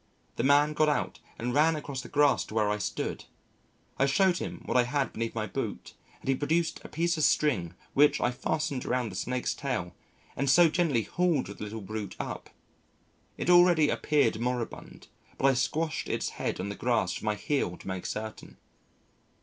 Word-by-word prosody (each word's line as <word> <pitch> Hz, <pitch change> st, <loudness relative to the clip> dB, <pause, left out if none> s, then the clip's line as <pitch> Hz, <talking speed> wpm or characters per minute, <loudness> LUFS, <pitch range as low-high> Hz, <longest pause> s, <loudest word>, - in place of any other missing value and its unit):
The -, -, -1 dB
man 145 Hz, +2 st, +4 dB
got 155 Hz, 0 st, +3 dB
out 150 Hz, -, -1 dB, 0.2 s
and 120 Hz, +1 st, -2 dB
ran 160 Hz, +3 st, +4 dB
across 140 Hz, -3 st, -5 dB
the 120 Hz, -, -11 dB
grass 145 Hz, -4 st, +3 dB
to 110 Hz, -, -10 dB
where 105 Hz, -2 st, +2 dB
I 105 Hz, -, -1 dB
stood. -, -, -3 dB, 0.7 s
I 135 Hz, -, +4 dB
showed 180 Hz, +6 st, +3 dB
him -, -, -6 dB
what -, -, -2 dB
I 125 Hz, -, +7 dB
had 140 Hz, +3 st, -1 dB
beneath 115 Hz, +1 st, -3 dB
my 110 Hz, -1 st, -1 dB
boot -, -, -5 dB, 0.3 s
and -, -, -13 dB
he 135 Hz, -, +4 dB
produced 160 Hz, +5 st, 0 dB
a -, -, -9 dB
piece 170 Hz, +2 st, 0 dB
of -, -, +1 dB
string 95 Hz, -, +2 dB, 0.2 s
which 145 Hz, +2 st, +4 dB
I 120 Hz, -, +1 dB
fastened 145 Hz, 0 st, -2 dB
around 125 Hz, -3 st, -1 dB
the -, -, -9 dB
snake's 125 Hz, +6 st, -1 dB
tail 115 Hz, -11 st, -3 dB, 0.4 s
and 140 Hz, +1 st, 0 dB
so 170 Hz, +5 st, +7 dB
gently 155 Hz, -8 st, +1 dB
hauled 175 Hz, -3 st, +1 dB
the 100 Hz, +1 st, -8 dB
little 110 Hz, +1 st, -6 dB
brute 105 Hz, +1 st, -5 dB
up. -, -, -5 dB, 0.9 s
It 180 Hz, -, +1 dB
already 175 Hz, -3 st, +6 dB
appeared 140 Hz, -8 st, +1 dB
moribund, 125 Hz, -1 st, -4 dB, 0.3 s
but -, -, 0 dB
I 135 Hz, -, +6 dB
squashed 155 Hz, +4 st, -1 dB
its -, -, -1 dB
head -, -, -3 dB
on 95 Hz, +2 st, -3 dB
the 100 Hz, -, -5 dB
grass 115 Hz, -8 st, 0 dB
with -, -, -11 dB
my 105 Hz, -1 st, 0 dB
heel 105 Hz, -8 st, -1 dB
to -, -, -13 dB
make 95 Hz, -1 st, -4 dB
certain. 110 Hz, 0 st, -6 dB
130 Hz, 190 wpm, -29 LUFS, 110-150 Hz, 0.9 s, I